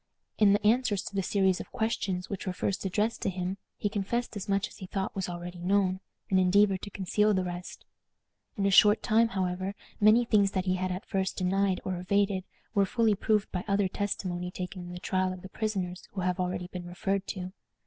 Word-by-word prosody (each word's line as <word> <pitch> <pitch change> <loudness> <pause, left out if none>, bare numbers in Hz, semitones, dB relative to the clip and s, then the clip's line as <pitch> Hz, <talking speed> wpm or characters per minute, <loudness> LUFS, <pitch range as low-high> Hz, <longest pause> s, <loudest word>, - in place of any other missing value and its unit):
In 205 -2 +6
the 205 +1 +1
answers 220 -3 +3
to - - -7
the 195 - +2
series 190 -1 +2
of - - -8
questions 210 -6 -1
which 200 -1 -5
were 185 - -1
first 195 +2 -2
addressed 210 +4 0
to - - +1
him, 185 +1 -3 0.2
he - - 0
confessed 210 +4 -2
as 200 0 -5
much 200 +2 +1
as - - -15
he 185 - -8
thought 190 0 -3
was 190 -2 -2
already 175 0 -6
known, 185 +1 +2 0.3
and 190 - +5
endeavored 190 +1 +4
to 205 - -6
conceal 210 +2 +1
the 185 - +1
rest. 175 0 -6 0.7
In 200 - +1
a 200 - +3
short 210 +2 +6
time, 225 +2 +4
however, 190 -2 -2 0.2
many 215 +3 +6
things 205 -3 +3
that 185 -1 0
he 185 - +2
had 185 0 -1
at 180 +2 -4
first 190 -1 -1
denied 190 0 +1
or 185 -2 -2
evaded 195 0 +1 0.3
were 200 -2 +3
fully 225 0 +3
proved 210 +1 +1
by 180 -1 -2
other 200 -1 +2
testimony 185 -2 -3
taken 180 +1 -6
in 175 0 -8
the 180 - -6
trial 185 0 0
of 185 - -10
the 190 - -8
prisoners 190 -4 -3
who 195 - -3
have 180 0 0
already 180 0 -1
been 180 -1 -7
referred 195 +2 -2
to. 185 -1 -5
190 Hz, 215 wpm, -29 LUFS, 180-205 Hz, 0.7 s, In